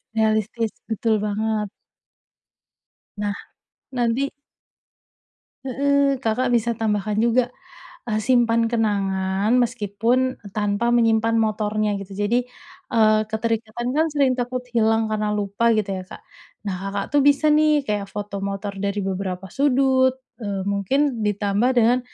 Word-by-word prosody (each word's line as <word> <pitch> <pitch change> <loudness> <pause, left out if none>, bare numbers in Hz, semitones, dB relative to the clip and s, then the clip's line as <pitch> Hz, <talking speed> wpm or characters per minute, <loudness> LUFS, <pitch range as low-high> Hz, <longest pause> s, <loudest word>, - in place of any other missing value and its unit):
Realistis, 220 0 +1 0.2
betul 220 -1 +1
banget. 210 0 -1 1.5
Nah, 205 -1 -1 0.6
nanti 245 +2 0 1.3
Heeh, 280 +1 +2
Kakak 245 +1 0
bisa 235 -1 +1
tambahkan 210 -1 -1
juga, 240 +1 +2 0.6
eee, 215 - 0
simpan 230 -1 +3
kenangan 200 -1 0
meskipun 240 +3 0
tanpa 205 +2 0
menyimpan 230 -1 +3
motornya 215 -1 0
gitu. 195 0 -9
Jadi, 215 +4 +2 0.5
eee, 215 -1 +4
keterikatan 230 +2 -2
kan 315 +2 +3
sering 275 -3 +3
takut 250 +1 -3
hilang 225 -1 +3
karena 215 -1 0
lupa 205 +3 0
gitu 210 - +1 0.2
ya - - -10
Kak. - - -12 0.4
Nah 195 -2 -2
Kakak 200 0 -2
tuh 290 - +5
bisa 290 +2 +4
nih 300 -2 +3
kayak 205 -2 -2
foto 200 -1 -5
motor 200 0 -4
dari 200 0 -1
beberapa 190 -1 -3
sudut, 265 -1 +3 0.2
eee, 200 -2 -3
mungkin 230 +6 0
ditambah 205 +4 +1
dengan 240 +2 +4
220 Hz, 120 wpm, -22 LUFS, 205-245 Hz, 1.5 s, tuh